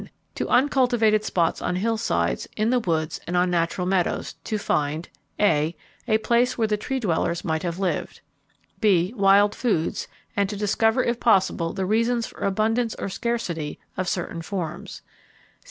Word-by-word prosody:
To - - -3
uncultivated 245 -6 +3
spots 170 -5 0
on 180 - -1
hillsides, 225 +4 0
in 220 +2 +2
the 250 - +3
woods, 160 -6 -1
and 180 - 0
on 180 0 +2
natural 170 +1 0
meadows 185 -1 0
to 215 - -1
find 155 -4 -1 0.3
(a) 165 -5 +2 0.3
A 220 -2 +4
place 235 +3 +1
where 225 -2 +2
the 210 - +1
Tree 265 +5 -3
dwellers 170 -5 -1
might 160 -1 0
have 170 -1 -3
lived. 190 -2 -2 0.6
(b) 195 -3 +3
Wild 200 0 +5
foods, 205 -11 -1 0.3
and 200 -1 +1
to 205 - -4
discover 225 +4 +2
if 235 0 -1
possible 190 -7 +2
the 190 - -2
reasons 230 +3 +1
for - - -12
abundance 220 +4 +1
or - - -4
scarcity 185 -9 -3 0.2
of 185 0 -2
certain 170 -2 -3
forms. 175 -1 -5
200 Hz, 155 wpm, -24 LUFS, 175-225 Hz, 0.6 s, Wild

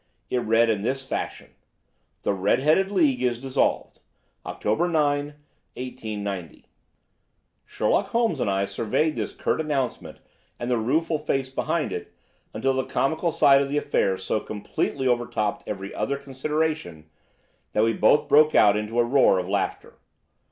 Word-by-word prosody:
It 125 - +1
read 115 0 +3
in 105 -3 -1
this 135 +5 -2
fashion: - - -5 0.7
"THE - - +1
RED 100 +7 +1
HEADED 175 +6 +3
LEAGUE 150 -10 +2
IS 120 -2 0
DISSOLVED. 135 0 -1 0.5
October 110 +12 0
9, 145 -3 0 0.4
1890." 105 -8 -6 1.0
Sherlock - - 0
Holmes 230 - 0
and 105 - 0
I 100 0 +1
surveyed 150 +10 -1
this - - -4
curt - - -1
announcement 140 -5 -3 0.4
and 120 +1 -3
the 120 - +2
rueful 155 +7 0
face 135 -3 -2
behind - - -1
it, - - -6 0.4
until 135 +5 0
the 130 0 0
comical 160 +5 0
side 140 -2 +5
of 140 - -2
the 145 - -1
affair 95 -9 +1
so 110 - -1
completely 110 +6 -3
overtopped 120 -4 -1
every 100 -1 -5
other 140 - -2
consideration 140 - -3 0.7
that 105 - +3
we 115 0 +2
both 145 +8 +3
burst 150 +1 +5
out 105 -1 +6
into 105 +2 -3
a - - +5
roar 125 -6 +4
of 90 -1 -2
laughter. 100 0 -3
130 Hz, 150 wpm, -24 LUFS, 105-145 Hz, 1.0 s, out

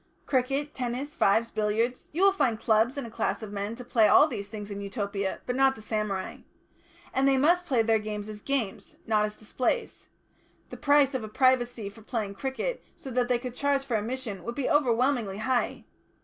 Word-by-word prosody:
Cricket, 275 +2 0
tennis, 255 +4 -3
fives, 225 +4 +2
billiards. 220 +4 -1
You 345 +5 0
will 395 - +7
find 240 - 0
clubs 225 +4 +2
and 280 - -3
a 230 - -9
class 225 - -2
of 210 - -7
men 205 +2 -3
to 250 - -9
play 225 -3 +4
all 295 - +7
these 200 -9 -5
things 210 -1 -7
in 200 0 -5
Utopia, 200 -1 -3
but 250 - -2
not 270 0 +4
the 220 - -12
samurai. 210 -3 -2 0.8
And 270 +1 +2
they 270 -1 +4
must 345 +6 +3
play 245 -5 +3
their 225 0 +3
games 210 -1 -5
as 210 -1 -8
games, 255 -7 -2
not 215 -1 +2
as 210 0 -6
displays; 255 - -2 0.6
the - - -6
price 285 -1 +4
of 260 -4 -2
a - - -5
privacy 245 -2 +2
for 200 +3 -11
playing 215 -3 -3
cricket, 265 - -3
so 265 - -9
that 250 0 +1
they 245 -1 +2
could 245 0 -6
charge 280 +1 0
for 245 -4 -1
admission, 220 -3 -3
would 235 +1 -5
be 280 - -1
overwhelmingly 245 -6 +2
high.... 245 +3 -1
235 Hz, 200 wpm, -28 LUFS, 215-265 Hz, 0.8 s, will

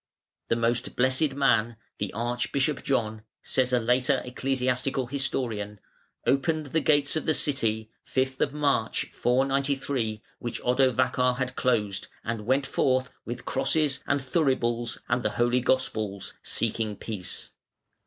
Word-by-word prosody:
"The - - +2
most 115 +1 0
blessed 130 +3 +2
man, 120 -5 +2 0.2
the 100 -2 -2
Archbishop 120 +5 -1
John", 110 -5 -1 0.2
says 130 -1 +1
a 125 - +4
later 125 +4 +2
ecclesiastical 130 +1 0
historian, 120 -6 -2 0.5
"opened 155 +3 +1
the 160 +3 0
gates 145 -1 +3
of 155 - -2
the 155 - +4
city, 110 -6 +1
5 130 +1 0
March, 140 -6 0
493, 135 -3 0 0.2
which 120 - -4
Odovacar 125 0 +2
had 130 -1 -2
closed, 105 -6 0 0.2
and 115 -2 -4
went 135 +2 +2
forth 130 -1 +1
with 120 - -6
crosses 150 -3 +1
and 140 - +2
thuribles 130 -5 0
and 125 - +1
the - - +1
Holy 120 +1 +3
Gospels, 110 -6 -1
seeking 110 -2 -1
peace. 100 -4 -5
125 Hz, 125 wpm, -27 LUFS, 115-135 Hz, 0.5 s, a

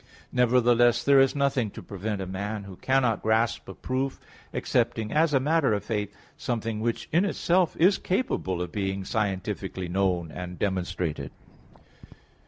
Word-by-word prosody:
Nevertheless, 120 -1 +4
there 140 -1 +6
is 135 +1 +4
nothing 140 -5 +1
to - - -10
prevent 100 +1 -4
a - - -3
man, 100 +3 -4
who 100 -1 -10
cannot 125 -2 +1
grasp 110 +1 +1
a - - -8
proof, 130 +1 -2 0.3
accepting, 110 -1 0
as 160 +1 +3
a 135 - +4
matter 145 -2 +2
of 100 -1 -1
faith, 105 -2 -2 0.3
something 115 -2 -2
which 115 +1 -2
in 170 +4 +4
itself 185 -3 +1
is 185 +4 +4
capable 95 - -1
of 90 - -7
being 95 -2 -2
scientifically 95 -3 -2
known 90 -3 0
and 90 +1 -7
demonstrated. 90 -7 -2
110 Hz, 150 wpm, -27 LUFS, 95-130 Hz, 0.3 s, there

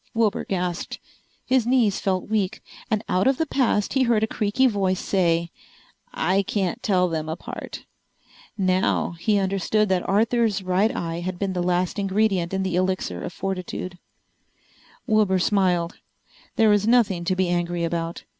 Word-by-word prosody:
Wilbur 225 0 +1
gasped. 180 -2 -3 0.5
His 255 -3 +2
knees 240 -6 +2
felt 185 -2 -1
weak, 210 -1 -1 0.3
and 215 0 0
out 185 +5 +2
of 265 -1 +3
the 320 - 0
past 250 -8 0
he 270 - +2
heard 235 -4 +2
a - - +5
creaky 215 +5 +1
voice 195 -6 +1
say, 170 -3 +1 0.3
"... - - -34 0.2
I 195 +1 +4
can't 200 +3 -2
tell 185 -4 +2
them 160 -2 -3
apart." 160 - -7 0.7
Now 185 -1 +1
he 210 +4 +2
understood 195 +2 +1
that 185 -2 0
Arthur's 220 0 +2
right 185 +4 +2
eye 165 0 -3
had 180 +1 -4
been 195 0 -2
the 180 - -1
last 180 +2 0
ingredient 195 -3 +1
in 190 0 -1
the 185 -2 -1
Elixir 185 +1 -1
of 180 - -5
Fortitude! 185 -1 -5 1.1
Wilbur 210 -3 +3
smiled. 180 -3 +1 0.6
There 225 -3 +4
was 205 0 +3
nothing 220 -7 +3
to 185 +1 +1
be 185 -1 +1
angry 175 0 -1
about. 165 0 -3
190 Hz, 160 wpm, -24 LUFS, 180-215 Hz, 1.1 s, a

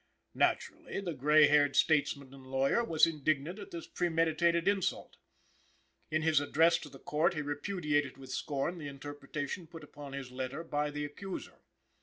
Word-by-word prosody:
Naturally, - - 0
the 180 -4 -3
gray 150 +2 +6
haired 145 -1 +4
statesman 140 -3 +2
and 135 -1 -13
lawyer 135 - +2
was 165 -9 +4
indignant 155 +3 -1
at 200 - -8
this 170 - -7
premeditated 170 0 +1
insult. 200 -2 0 0.9
In 155 +1 0
his 160 -2 +4
address 165 +4 +3
to 150 - -9
the 135 - -12
Court 155 +6 +1
he 155 - -1
repudiated 145 -2 -1
with 130 -1 -10
scorn 145 +6 -2
the 150 - -6
interpretation 145 +3 -6
put 165 -1 -11
upon 145 -1 -10
his 135 -2 -6
letter 130 +5 -4
by 150 -2 -1
his 150 0 -3
accuser. 190 +6 -7
150 Hz, 160 wpm, -32 LUFS, 140-165 Hz, 0.9 s, gray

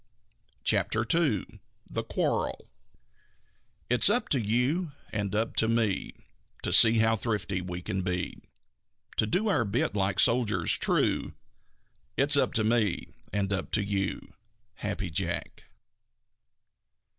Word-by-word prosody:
CHAPTER 110 +1 +1
II 150 - +1 0.4
THE - - -4
QUARREL - - -2 1.2
It's 125 +9 +4
up 240 +4 +1
to 135 -5 +3
you 135 - 0 0.2
and 105 -2 -2
up 110 +2 -1
to 110 - +3
me 115 -4 0 0.5
To - - -1
see 115 0 +7
how 110 0 +3
thrifty 100 -4 -2
we 90 -1 -6
can 95 - -2
be. 90 -1 -3 0.8
To 110 - +2
do 190 - +1
our 195 - +2
bit 105 +1 -1
like 100 -1 0
soldiers 115 -7 +3
true - - 0 0.8
It's 140 +2 +5
up 140 - +2
to 115 -4 +1
me 110 -4 0 0.2
and 100 0 -1
up 95 - -3
to 105 - +2
you. 100 -1 -3 0.5
_Happy - - -3
Jack. - - -4
110 Hz, 125 wpm, -28 LUFS, 100-125 Hz, 1.2 s, see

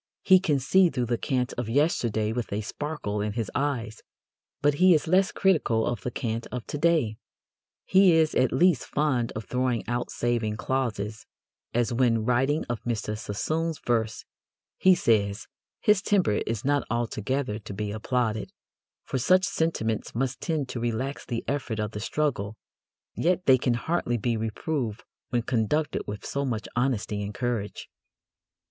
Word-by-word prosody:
He 185 -1 +7
can 155 -6 +1
see 180 +7 +4
through 125 -5 -1
the 120 0 0
cant 125 -2 -1
of 120 -2 -3
yesterday 115 -6 +1
with 120 -1 -3
a 105 +2 -1
sparkle 115 -3 -4
in 105 0 -2
his 115 -3 -3
eyes, 120 -6 -2 0.6
but 145 +1 +3
he 185 -2 +7
is 150 - 0
less 190 +4 +3
critical 150 - +2
of 120 -4 -2
the - - -3
cant 115 -1 -3
of 125 -2 -4
to 145 - -5
day. 155 -10 +2 0.7
He 190 -2 +6
is 160 -1 +3
at 130 - +3
least 160 0 +3
fond 135 -6 0
of 110 -1 -5
throwing 125 0 -1
out 120 +1 -2
saving 115 -3 -1
clauses, 110 -4 -2 0.5
as 120 -1 +1
when, 115 -3 +2
writing 135 +5 +2
of 120 -2 -3
Mr. 110 -3 -2
Sassoon's 155 +10 -2
verse, 115 -2 -1 0.5
he 185 -1 +6
says: 105 - +1 0.3
"His 210 -2 +4
temper 185 - +2
is 115 0 -3
not 145 0 +2
altogether 120 +1 -1
to 105 - -9
be 105 +1 -3
applauded, 110 0 -1 0.5
for 130 - -2
such 185 +9 +4
sentiments 115 -14 -1
must 125 +1 -1
tend 155 -5 -1
to 120 - -4
relax 120 +4 -3
the 115 -2 -3
effort 130 -6 -2
of 105 0 -2
the 105 - -5
struggle, 110 -4 -1 0.6
yet 180 +1 +1
they 130 -1 +6
can 125 -1 +1
hardly 120 -2 -1
be 120 +1 0
reproved 115 +1 -3 0.3
when 120 -2 0
conducted 130 +7 0
with 105 0 -6
so 140 - -2
much 120 -5 -2
honesty 115 -4 0
and 100 0 -5
courage." 120 -5 -3
120 Hz, 165 wpm, -27 LUFS, 110-145 Hz, 0.7 s, He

